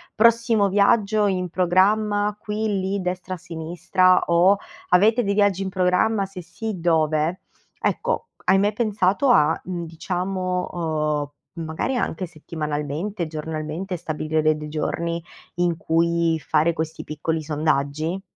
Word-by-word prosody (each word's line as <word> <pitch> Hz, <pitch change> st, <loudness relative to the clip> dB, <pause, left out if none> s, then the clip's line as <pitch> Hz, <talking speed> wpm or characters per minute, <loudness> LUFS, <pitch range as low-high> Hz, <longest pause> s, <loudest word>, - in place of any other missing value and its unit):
"Prossimo 230 Hz, -2 st, +4 dB
viaggio 205 Hz, +1 st, +3 dB
in 180 Hz, -2 st, -1 dB
programma 205 Hz, +4 st, +2 dB
qui, 210 Hz, -1 st, -2 dB
lì, 190 Hz, +1 st, -1 dB
destra, 180 Hz, +1 st, -3 dB
sinistra", 175 Hz, +2 st, +1 dB
o, 175 Hz, +4 st, +5 dB, 0.3 s
"Avete 220 Hz, +7 st, +4 dB
dei 200 Hz, -, 0 dB
viaggi 200 Hz, -2 st, +2 dB
in 190 Hz, -, -2 dB
programma? 190 Hz, +3 st, +2 dB
Se 190 Hz, -1 st, -9 dB
sì, 205 Hz, +3 st, -6 dB
dove?" 160 Hz, 0 st, +1 dB, 0.4 s
Ecco, 480 Hz, -1 st, -1 dB, 0.2 s
hai 190 Hz, -, +5 dB
mai 205 Hz, +1 st, +2 dB
pensato 210 Hz, +1 st, +1 dB
a, 160 Hz, -9 st, +4 dB
mhmm, 175 Hz, -2 st, -4 dB
diciamo, 180 Hz, +2 st, -2 dB
uhm, 155 Hz, -1 st, -3 dB
magari, 160 Hz, +12 st, -2 dB
anche 185 Hz, -5 st, -2 dB
settimanalmente, 155 Hz, +4 st, -4 dB
giornalmente, 155 Hz, +4 st, -4 dB
stabilire 155 Hz, -1 st, -2 dB
de 155 Hz, 0 st, +3 dB
dei 150 Hz, 0 st, -7 dB
giorni, 170 Hz, +2 st, -2 dB, 0.3 s
in 175 Hz, -1 st, +1 dB
cui 165 Hz, 0 st, +1 dB
fare 155 Hz, +2 st, +2 dB
questi 160 Hz, -1 st, -4 dB
piccoli 160 Hz, +1 st, -3 dB
sondaggi? 155 Hz, +3 st, -1 dB
180 Hz, 130 wpm, -23 LUFS, 160-200 Hz, 0.4 s, o